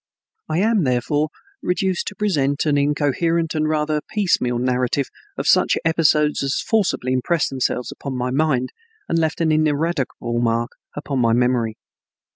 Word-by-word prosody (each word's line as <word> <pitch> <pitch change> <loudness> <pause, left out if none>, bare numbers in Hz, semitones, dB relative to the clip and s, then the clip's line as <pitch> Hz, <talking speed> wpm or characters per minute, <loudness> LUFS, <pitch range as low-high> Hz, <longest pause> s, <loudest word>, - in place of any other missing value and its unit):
I 155 - 0
am, 215 -3 +2
therefore, 145 +4 0 0.3
reduced 185 0 -1
to 205 - -4
present 145 -10 0
an 150 -2 +2
incoherent 150 +3 +1
and 155 -1 0
rather 150 0 0
piecemeal 175 - +1
narrative 125 +2 0 0.3
of - - -3
such - - +4
episodes 150 -2 +3
as 140 0 0
forcibly 190 - 0
impressed 145 +6 0
themselves 125 -1 -1
upon 135 -2 -6
my 125 0 -1
mind 135 -3 +1 0.4
and 165 - +1
left 160 +1 -1
an 160 -1 +2
ineradicable 150 -6 0
mark 115 0 0 0.2
upon 145 -2 -3
my 115 -2 +3
memory. 120 -2 +1
145 Hz, 145 wpm, -21 LUFS, 125-165 Hz, 0.4 s, such